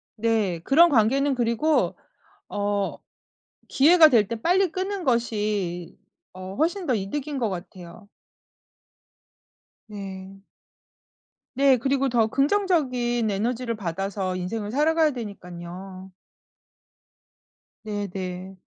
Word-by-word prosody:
네. 215 Hz, -6 st, 0 dB
그런 335 Hz, -, +6 dB
관계는 270 Hz, +3 st, +2 dB
그리고 245 Hz, +6 st, +1 dB, 0.5 s
어 205 Hz, -1 st, -1 dB, 0.7 s
기회가 315 Hz, +3 st, +6 dB
될 225 Hz, -8 st, +3 dB
때 230 Hz, -1 st, -4 dB
빨리 365 Hz, +5 st, +2 dB
끊는 380 Hz, +2 st, -3 dB
것이 210 Hz, -, -1 dB, 0.4 s
어 185 Hz, +1 st, -8 dB
훨씬 340 Hz, -, -1 dB
더 260 Hz, -, +2 dB
이득인 275 Hz, +8 st, -3 dB
것 235 Hz, -4 st, 0 dB
같아요. 180 Hz, +1 st, -9 dB, 1.8 s
네. 195 Hz, -2 st, -8 dB, 1.2 s
네 270 Hz, -1 st, +5 dB
그리고 270 Hz, +2 st, 0 dB
더 235 Hz, -3 st, +2 dB
긍정적인 265 Hz, -, +1 dB
에너지를 230 Hz, +4 st, -2 dB
받아서 195 Hz, 0 st, -3 dB
인생을 205 Hz, +4 st, -4 dB
살아가야 310 Hz, +3 st, +3 dB
되니깐요. 190 Hz, -4 st, -9 dB, 1.7 s
네네. 190 Hz, -3 st, -5 dB
225 Hz, 200 characters per minute, -24 LUFS, 195-275 Hz, 1.8 s, 그런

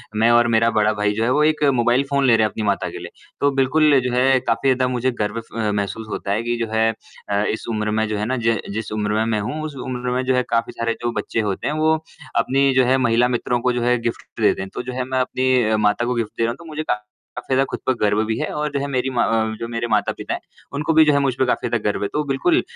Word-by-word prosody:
मैं 110 Hz, +2 st, +3 dB
और 120 Hz, 0 st, +5 dB
मेरा 115 Hz, 0 st, +3 dB
बड़ा 110 Hz, 0 st, +2 dB
भाई 105 Hz, 0 st, 0 dB
जो 110 Hz, -, 0 dB
है, 115 Hz, -, +1 dB
वो 150 Hz, +3 st, +3 dB
एक 155 Hz, 0 st, +2 dB
मोबाइल 120 Hz, +2 st, +2 dB
फ़ोन 140 Hz, -1 st, +2 dB
ले 120 Hz, -3 st, +5 dB
रहे 110 Hz, -, +3 dB
हैं -, -, 0 dB
अपनी 110 Hz, -, -4 dB
माता 100 Hz, -1 st, 0 dB
के -, -, -8 dB
लिए। -, -, -8 dB, 0.3 s
तो 140 Hz, 0 st, +3 dB
बिल्कुल, 140 Hz, +2 st, +4 dB
जो 125 Hz, -1 st, -2 dB
है 130 Hz, +1 st, +4 dB
काफ़ी 130 Hz, +2 st, 0 dB
ज़्यादा 130 Hz, 0 st, 0 dB
मुझे 125 Hz, 0 st, 0 dB
गर्व 105 Hz, +2 st, -1 dB
फ 110 Hz, -1 st, -3 dB
महसूस 105 Hz, +2 st, -3 dB
होता 100 Hz, -, -4 dB
है 105 Hz, +3 st, 0 dB
कि 120 Hz, 0 st, -1 dB
जो -, -, -3 dB
है 110 Hz, 0 st, +3 dB, 0.4 s
अ, 100 Hz, 0 st, +1 dB
इस 110 Hz, -, -2 dB
उम्र 105 Hz, -1 st, -1 dB
में 110 Hz, 0 st, 0 dB
जो 105 Hz, 0 st, -2 dB
है 105 Hz, -, -1 dB
ना, 130 Hz, +3 st, -1 dB
ज 115 Hz, -1 st, +1 dB, 0.2 s
जिस 110 Hz, 0 st, -4 dB
उम्र 105 Hz, -1 st, -1 dB
में 110 Hz, +1 st, +1 dB
मैं 110 Hz, -2 st, 0 dB
हूँ, 150 Hz, +10 st, -4 dB
उस 155 Hz, -2 st, -6 dB
उम्र 125 Hz, -1 st, -3 dB
में 130 Hz, -, 0 dB
जो 130 Hz, 0 st, +2 dB
है 125 Hz, -, +2 dB
काफ़ी 115 Hz, 0 st, 0 dB
सारे 115 Hz, 0 st, -1 dB
जो 120 Hz, 0 st, -1 dB
बच्चे 115 Hz, -, -3 dB
होते 100 Hz, -3 st, -2 dB
हैं, -, -, 0 dB
वो 155 Hz, +1 st, +3 dB, 0.4 s
अपनी 135 Hz, +1 st, +2 dB
जो 130 Hz, -, +5 dB
है 130 Hz, +2 st, +3 dB
महिला 120 Hz, -1 st, +3 dB
मित्रों 120 Hz, 0 st, -1 dB
को 125 Hz, +1 st, +1 dB
जो 120 Hz, -, -1 dB
है 125 Hz, +1 st, +3 dB
गिफ्ट 115 Hz, 0 st, -5 dB
देते -, -, +3 dB
हैं। 95 Hz, -, -6 dB
तो -, -, -3 dB
जो 125 Hz, -, -6 dB
है 130 Hz, 0 st, -2 dB
मैं 130 Hz, 0 st, -1 dB
अपनी 130 Hz, -3 st, +1 dB
माता 105 Hz, +3 st, +2 dB
को 125 Hz, -, 0 dB
गिफ्ट 115 Hz, -2 st, -2 dB
दे -, -, +1 dB
रहा 115 Hz, -, +2 dB
हूँ, -, -, -6 dB
तो 170 Hz, -, -14 dB
मुझे 155 Hz, -1 st, -5 dB
काफ़ी 105 Hz, +2 st, -5 dB
ज़्यादा 130 Hz, +1 st, +4 dB
खुद -, -, -4 dB
पर 130 Hz, -, +4 dB
गर्व 105 Hz, +1 st, +2 dB
भी 110 Hz, 0 st, -2 dB
है। 155 Hz, -, -1 dB
और 150 Hz, 0 st, -2 dB
जो 140 Hz, -, 0 dB
है 140 Hz, -, -2 dB
मेरी 130 Hz, -1 st, -1 dB
माँ 120 Hz, -, +2 dB, 0.3 s
जो 115 Hz, -, -4 dB
मेरे 115 Hz, 0 st, -3 dB
माता-पिता 105 Hz, -1 st, 0 dB
हैं, -, -, -3 dB, 0.3 s
उनको 150 Hz, +3 st, 0 dB
भी 160 Hz, 0 st, +6 dB
जो 150 Hz, -, +4 dB
है 140 Hz, -, +3 dB
मुझ 135 Hz, -2 st, +1 dB
पे 130 Hz, -, +3 dB
काफ़ी 125 Hz, -, 0 dB
ज़्यादा 115 Hz, -2 st, -1 dB
गर्व 105 Hz, -, -2 dB
है। -, -, 0 dB
तो 150 Hz, -, 0 dB
बिल्कुल 230 Hz, -, +2 dB
120 Hz, 290 wpm, -21 LUFS, 110-130 Hz, 0.4 s, भी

